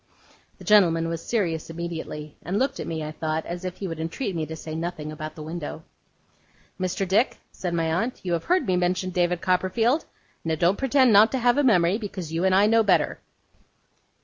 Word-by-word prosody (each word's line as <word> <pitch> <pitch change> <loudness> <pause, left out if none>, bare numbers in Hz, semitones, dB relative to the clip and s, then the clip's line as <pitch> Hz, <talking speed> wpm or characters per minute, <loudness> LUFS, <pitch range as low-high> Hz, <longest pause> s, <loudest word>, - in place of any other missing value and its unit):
The - - -13
gentleman 170 -6 +4
was 165 0 -4
serious 170 -10 -1
immediately, 165 -3 -6
and 185 +4 -2
looked 270 +4 0
at - - -4
me, 160 -1 -3
I 155 - -5
thought, 155 0 -3
as 175 +1 -6
if 185 -1 -4
he 195 - -4
would 165 -2 -5
entreat 170 +5 -3
me 160 -2 -2
to 160 - -6
say 160 0 -7
nothing 160 -2 -4
about 155 0 -7
the 155 - -8
window. 160 0 -6 1.0
'Mr. 185 +1 -1
Dick,' 210 +7 +2
said 175 -2 -4
my 165 -1 +1
aunt, 230 +9 -1
'you 180 -2 -1
have 165 - -2
heard 365 +1 +2
me 185 - +1
mention 180 +1 0
David 175 -1 0
Copperfield? 205 - +1 0.4
Now 160 -1 0
don't 175 +5 +2
pretend 265 -3 +4
not 210 +3 +7
to - - +1
have 245 +2 +3
a - - +3
memory, 190 -5 +3
because 190 -7 -6
you 165 +2 0
and 190 0 +3
I 200 +2 +5
know 225 +1 +4
better. 205 -4 +2
180 Hz, 205 wpm, -25 LUFS, 165-205 Hz, 1.0 s, not